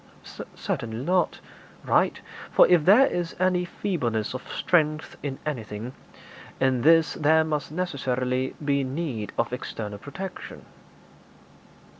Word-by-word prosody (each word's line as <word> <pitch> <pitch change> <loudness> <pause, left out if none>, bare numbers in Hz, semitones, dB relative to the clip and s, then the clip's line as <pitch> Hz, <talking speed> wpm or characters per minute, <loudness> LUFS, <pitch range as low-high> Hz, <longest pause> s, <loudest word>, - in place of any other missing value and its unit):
'Certainly 115 +2 -4
not.' 180 +1 +1 0.5
'Right; - - +2 0.3
for - - +6
if 175 -4 +4
there 220 +8 +7
is 175 -9 -2
any 180 -1 +2
feebleness 125 - -2
of 130 - -5
strength 155 -3 +1
in 135 -2 -4
anything, 115 -4 -5 0.7
in 130 -2 +2
this 165 +2 +5
there 160 +1 +3
must 150 -2 -3
necessarily 130 -6 -1
be 140 -1 +2
need 130 -6 -3
of 115 +1 0
external 105 -4 -5
protection.' 185 - -8
145 Hz, 115 wpm, -26 LUFS, 125-170 Hz, 0.7 s, there